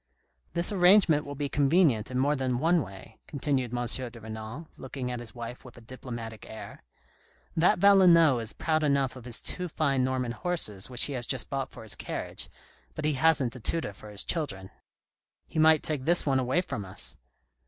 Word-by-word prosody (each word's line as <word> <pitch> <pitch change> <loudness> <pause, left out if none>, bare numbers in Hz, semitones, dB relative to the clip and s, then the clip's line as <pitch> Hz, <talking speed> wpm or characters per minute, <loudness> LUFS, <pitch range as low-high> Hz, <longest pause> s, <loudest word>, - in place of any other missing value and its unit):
"jThis 175 +5 +3
arrangement 180 -5 +5
will 145 - -6
be 145 0 -2
convenient 140 - +2
in 130 - -3
more 145 +3 +2
than 130 -2 -1
one 165 +5 +3
way," 100 0 -11
continued 135 -4 -1
M. 120 0 -2
de 120 0 -3
Renal, 110 +7 -8
looking 130 -1 -6
at 125 - -4
his 115 -3 -7
wife 120 +1 -7
with 125 - -14
a - - -12
diplomatic 115 -2 -8
air. 105 -2 -9 0.4
" - - -34
That - - +5
Valenod 175 -9 +6
is 115 - -3
proud 155 -1 -1
enough 140 -3 +1
of 125 -2 -11
his 120 -2 -2
two 180 - -2
fine 140 -5 0
Norman 130 -2 -1
horses 120 - -1
which 125 -1 +2
he 145 - 0
has 120 -2 -3
just 130 -3 -1
bought 135 -1 -2
for 115 - -12
his 110 -4 0
carriage, - - -5 0.5
but 155 - -4
he 155 - +2
hasn't 135 -3 +2
a - - -8
tutor 120 -1 -1
for 105 +2 -13
his 105 -1 0
children." 95 - -3 0.4
" - - -62
He 160 - -2
might 155 -1 +5
take 145 -4 -2
this 175 +1 +5
one 135 -2 +2
away 130 +7 +1
from 105 - -5
us." 95 0 -3
130 Hz, 200 wpm, -28 LUFS, 120-155 Hz, 0.5 s, Valenod